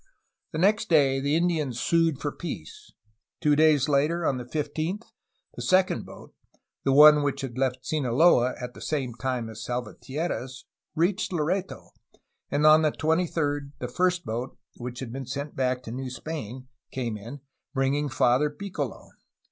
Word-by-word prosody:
The - - -4
next 205 +5 +2
day 140 -5 +4
the 140 +2 +1
Indians 160 -8 0
sued 165 -4 +2
for 145 - -2
peace. 420 - -8 0.5
Two 150 -1 +3
days 155 -2 +4
later, 150 +4 +1
on 135 - +1
the 125 - -7
15th, 155 - -3 0.5
the - - -7
second 185 0 +2
boat - - -13 0.5
(the 135 - +2
one 150 +2 +8
which 140 -1 -1
had 130 -4 -5
left 130 -1 -1
Sinaloa 130 -2 +3
at 125 -1 -6
the - - -13
same 135 -6 -2
time 120 0 -3
as 110 0 -8
Salvatierra's) 130 +3 -4 0.3
reached 185 +6 +1
Loreto, 180 +3 -2 0.6
and 145 +1 +1
on 155 +1 +8
the 155 -1 +2
23d 155 -3 -1
the 125 - -4
first 180 +6 0
boat 120 +4 -4 0.2
(which 125 +1 -6
had 125 -3 -6
been 135 -1 -6
sent 140 +3 -5
back 130 -1 0
to 115 - -7
New 130 +2 -4
Spain) 130 -1 -6 0.2
came 120 -4 -3
in, 120 +7 -9 0.3
bringing 140 +2 +1
Father 130 +2 +3
Piccolo. 150 - -6
145 Hz, 155 wpm, -26 LUFS, 130-160 Hz, 0.6 s, one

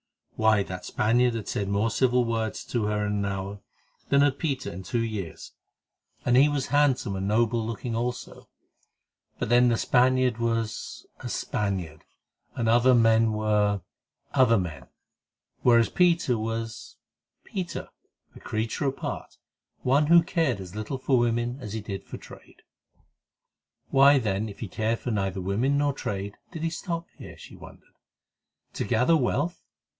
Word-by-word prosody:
Why, 110 -2 +3
that 90 -1 -7
Spaniard 120 +2 +2
had 110 -3 -5
said 100 -1 -2
more 105 +3 +1
civil 125 +1 +2
words 115 -3 -2
to 120 -4 -1
her 105 0 0
in 105 - -1
an 100 -1 -1
hour 100 +1 -4 0.5
than 140 0 +4
had 140 -1 +2
Peter 140 -5 -2
in 90 - -7
two 115 +6 -1
years, 105 -7 -5 0.7
and 120 - +3
he 140 +4 +6
was 145 -2 -1
handsome 140 -8 +2
and 95 +1 -2
noble 115 +2 +2
looking 115 +1 -4
also; 120 +2 -4 0.9
but - - -3
then 120 +1 +5
the 115 - +2
Spaniard 125 -1 +2
was—a 115 -2 -3
Spaniard, 90 -7 -3 0.5
and 115 -3 -1
other 120 +3 +5
men 115 -1 +4
were—other 105 +3 0
men, 75 -9 -4 0.7
whereas 115 -2 +5
Peter 170 -8 +3
was—Peter, 115 - -6 0.5
a - - -11
creature 110 +6 -2
apart, 135 - -5 0.5
one 140 +4 +3
who 170 +1 +7
cared 160 - 0
as 95 0 -9
little 110 +6 -4
for 130 -1 +2
women 120 +2 0
as 105 -4 -6
he 110 - -3
did 100 -2 -6
for - - -8
trade. - - -15 1.3
Why, 140 +1 +6
then, 105 -3 -1
if 100 - -11
he 110 - -3
cared 110 +4 -1
for 125 - -4
neither 95 -3 -1
women 115 +10 +1
nor 145 0 +1
trade, 100 -6 -5
did 165 -3 -6
he 165 - 0
stop 170 0 -4
here? - - -10
she - - -12
wondered. - - -15 0.8
To - - -2
gather 125 +9 +3
wealth? 145 +4 0
115 Hz, 150 wpm, -26 LUFS, 105-130 Hz, 1.3 s, who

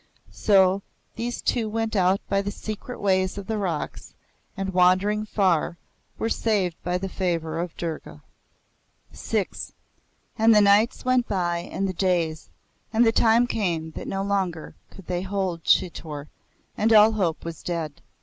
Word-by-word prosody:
So 195 -1 +4 0.3
those 240 +1 -4
two 225 -3 0
went 225 0 -2
out 190 0 +3
by 195 0 +1
the 200 - -3
secret 215 +4 -7
ways 185 -1 +1
of 200 - -6
the 220 +1 -2
rocks, 175 -6 -4 0.4
and 195 -1 -3
wandering 185 +4 +3
far, 185 -5 +1 0.4
were 225 - -1
saved 205 -7 0
by 180 0 -1
the 190 +1 -4
favour 165 -4 -2
of 175 -1 -4
Durga. 155 - -6 0.9
VI - - -1 0.9
And 225 0 +6
the - - +7
nights 205 +5 +3
went 255 -1 +2
by 175 -3 0
and 195 +3 -3
the 185 - -3
days, 170 -4 0 0.4
and 230 +2 +4
the 225 - +5
time 230 +1 +4
came 170 -9 -2
that - - -7
no 195 0 -2
longer 190 -5 -2 0.2
could 195 - -14
they 175 0 -2
hold 190 -3 -2
Chitor, 155 -4 0 0.5
and 220 +2 +1
all 215 0 +7
hope 185 -8 -1
was 165 -1 -6
dead. 165 -4 -4
190 Hz, 155 wpm, -25 LUFS, 175-210 Hz, 0.9 s, the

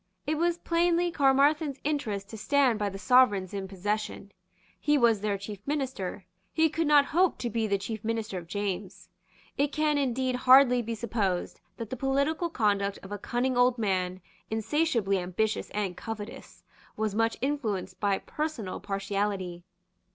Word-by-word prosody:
It 305 +2 -1
was 345 0 +1
plainly 345 0 +1
Caermarthen's 285 0 +3
interest 235 -10 -2
to - - -8
stand 265 -2 +2
by 205 -1 0
the 195 - -7
sovereigns 205 -5 +4
in 195 -1 -4
possession. 205 +1 -3 0.5
He 295 0 +2
was 230 -5 +3
their 205 -1 0
chief 200 0 -7
minister. 260 -10 -3 0.3
He 320 0 +3
could 330 -2 0
not 290 -1 +6
hope 360 +4 +2
to 240 - -3
be 225 -1 0
the 200 -1 +1
chief 215 +2 -6
minister 220 -4 -2
of 170 - -12
James. 195 -1 -4 0.5
It 285 0 +2
can 305 -1 +1
indeed 260 -1 0
hardly 255 0 +6
be 230 0 -4
supposed 210 -5 -2 0.2
that 225 -2 -6
the - - -2
political 280 +5 +1
conduct 200 -7 0
of 195 - -10
a 205 - -4
cunning 245 +5 -1
old 245 0 +4
man, 185 -4 -1 0.3
insatiably 225 -3 +1
ambitious 185 +5 -1
and 200 -4 -2
covetous, 220 0 -8 0.3
was 215 -2 -1
much 225 +1 +1
influenced 220 -10 -2
by 200 -2 +1
personal 300 -11 -4
partiality. 195 -3 -3
225 Hz, 160 wpm, -28 LUFS, 200-280 Hz, 0.5 s, not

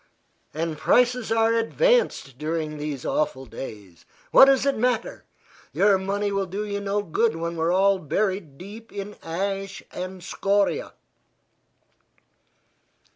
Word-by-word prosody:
"And 160 0 -3
prices 245 -2 +2
are 225 0 +3
advanced 230 - +1
during 155 0 -3
these 145 -3 -5
awful 140 -3 -1
days. 105 -7 -9 0.3
What - - +9
does 270 -1 +3
it 280 - +2
matter? 240 0 -1 0.5
Your 200 -1 +4
money 200 +2 -1
will 195 -1 -1
do 200 +4 -4
you 200 -1 -3
no 200 +1 -1
good 220 +6 +1
when 170 +1 -3
we 160 - -4
are 165 +1 +2
all 195 +1 +3
buried 185 -2 -2
deep 215 +6 -11
in 205 0 -6
ash 195 +3 -4
and 185 0 -6
scoria." 200 - 0
195 Hz, 130 wpm, -24 LUFS, 165-215 Hz, 0.5 s, What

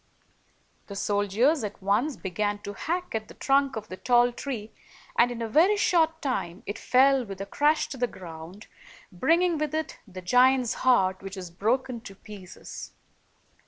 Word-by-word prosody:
The 200 - -8
soldiers 205 +8 +1
at 210 -1 -5
once 205 +9 0
began 205 +2 -2
to 205 - -5
hack 350 - -3
at 220 -1 -3
the - - -13
trunk 275 0 +2
of 215 -1 -6
the 185 - -8
tall 245 +1 +3
tree, 240 -4 -6 0.4
and, 240 - +4
in 235 -1 -4
a - - -2
very 345 - +4
short 325 -4 +2
time, 190 -10 -3
it 205 - -5
fell 265 +1 +4
with 195 -4 -8
a 195 - -4
crash 295 +9 +2
to 270 - -6
the 245 0 +1
ground, 175 +1 -10 0.5
bringing 330 - +2
with 305 0 -2
it 315 0 -3
the 185 -1 -9
giant's 250 +4 +4
heart, 190 -7 +3
which 195 +1 -7
was 180 -3 -7
broken 235 +6 -1
to 200 -4 -11
pieces. 195 -2 -10
235 Hz, 170 wpm, -27 LUFS, 195-275 Hz, 0.5 s, and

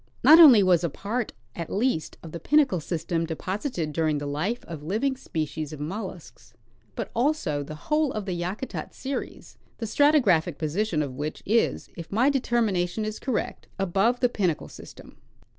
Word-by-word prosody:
Not 320 +2 +9
only 260 -11 +9
was 180 -2 +3
a 170 - +1
part, 215 - -3 0.2
at 170 -2 -5
least, 210 -6 -1
of 165 - -9
the 170 - -6
Pinnacle 280 - +3
system 165 +1 -2
deposited 170 - -3
during 155 -1 +1
the 145 - -4
life 160 +12 -2
of 165 -4 -7
living 220 - -1
species 155 - -4
of 150 - -8
mollusks, 170 - -7 0.4
but - - -4
also 240 - 0
the 150 +2 -7
whole 300 - 0
of 215 -2 -4
the 190 - -2
Yakutat 180 +9 -5
series, 270 +1 -6 0.2
the 230 - -4
stratigraphic 215 - +3
position 160 +1 -1
of 135 -3 -5
which 150 +4 -5
is, 225 +3 +1
if 170 -1 -9
my 245 +8 +3
determination 220 -7 0
is 215 0 -4
correct, 260 -5 -3
above 195 +6 +1
the 245 - +4
Pinnacle 185 -9 -1
system. - - -13
190 Hz, 165 wpm, -26 LUFS, 160-240 Hz, 0.4 s, Not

